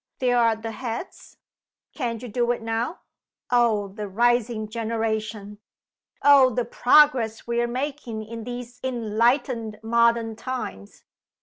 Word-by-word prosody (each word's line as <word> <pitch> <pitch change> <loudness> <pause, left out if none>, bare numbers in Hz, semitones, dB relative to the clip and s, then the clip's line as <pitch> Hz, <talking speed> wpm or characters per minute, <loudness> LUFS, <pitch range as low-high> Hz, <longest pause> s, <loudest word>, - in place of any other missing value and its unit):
There 250 -1 +1
are 230 -1 +3
the 225 +1 -6
heads. 235 - -7 0.6
Can't 235 -4 -3
you - - -5
do 240 +2 -1
it 245 -2 -1
now? 225 +8 -2 0.5
Oh, 230 -4 +3
the 210 +1 -6
rising 235 +1 +1
generation! 220 -2 -3 0.6
Oh, 280 -2 +7
the 245 0 -1
progress 245 -3 +3
we 235 0 0
are 240 - 0
making 250 -3 -4
in 230 +1 -7
these 245 +1 -7
enlightened 235 -1 0
modern 230 0 +2
times! 225 - -6
235 Hz, 125 wpm, -24 LUFS, 220-245 Hz, 0.6 s, Oh